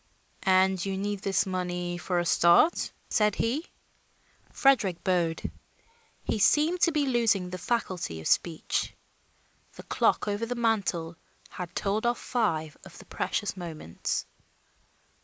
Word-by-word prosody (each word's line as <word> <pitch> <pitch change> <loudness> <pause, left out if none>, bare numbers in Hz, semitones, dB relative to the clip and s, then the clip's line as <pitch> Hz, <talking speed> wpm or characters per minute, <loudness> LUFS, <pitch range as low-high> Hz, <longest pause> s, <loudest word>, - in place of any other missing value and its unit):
"And 190 -1 +4
you 195 -1 -2
need 205 +1 -2
this 195 0 +1
money 180 -2 -3
for 180 0 -1
a 175 - +1
start?" 170 - +4 0.2
said 210 -2 +2
he. 270 +9 -1 0.8
Frederick 225 -11 +2
bowed; 170 -3 0 0.8
he - - -1
seemed 310 - +3
to 335 - +4
be 300 -2 +1
losing 225 -8 +1
the 185 - -5
faculty 185 - -2
of 80 - -5
speech. 165 -2 0 0.8
The - - -11
clock - - +1
over 205 +3 -1
the 245 - -3
mantel 195 -8 0 0.3
had 180 0 -7
told 210 +4 0
off 240 - +1
five 160 -11 -1
of - - -13
the - - -13
precious 205 -3 -2
moments. 160 - -4
190 Hz, 135 wpm, -28 LUFS, 175-230 Hz, 0.8 s, And